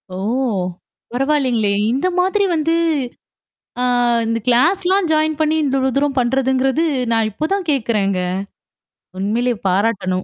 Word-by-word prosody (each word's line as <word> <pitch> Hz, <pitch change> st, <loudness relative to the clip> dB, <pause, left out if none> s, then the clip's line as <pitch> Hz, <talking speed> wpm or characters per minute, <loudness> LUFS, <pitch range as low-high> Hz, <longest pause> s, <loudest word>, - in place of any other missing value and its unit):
ஓ! -, -, -5 dB, 1.0 s
பரவாயில்லங்களே! 255 Hz, -6 st, +1 dB, 0.2 s
இந்த 280 Hz, +8 st, 0 dB
மாதிரி 385 Hz, +3 st, +2 dB
வந்து 320 Hz, +1 st, 0 dB, 1.1 s
ஆ -, -, +1 dB, 0.4 s
இந்த 230 Hz, 0 st, -1 dB
கிளாஸ்லாம் 355 Hz, +9 st, +2 dB
ஜாயின் 310 Hz, 0 st, +1 dB
பண்ணி, 310 Hz, 0 st, +2 dB
இந்த 270 Hz, -1 st, 0 dB
இவ்ளோ 265 Hz, 0 st, +1 dB
தூரம் 280 Hz, -1 st, 0 dB
பண்றதுங்கிறது 265 Hz, +4 st, +1 dB, 0.3 s
நான் 225 Hz, -1 st, +2 dB
இப்ப 305 Hz, +10 st, -3 dB
தான் 385 Hz, -4 st, -2 dB
கேட்கறேங்க. 210 Hz, -7 st, 0 dB, 1.0 s
உண்மையிலேயே 230 Hz, +4 st, 0 dB
பாராட்டணும். 185 Hz, -1 st, 0 dB
265 Hz, 115 wpm, -18 LUFS, 225-310 Hz, 1.1 s, மாதிரி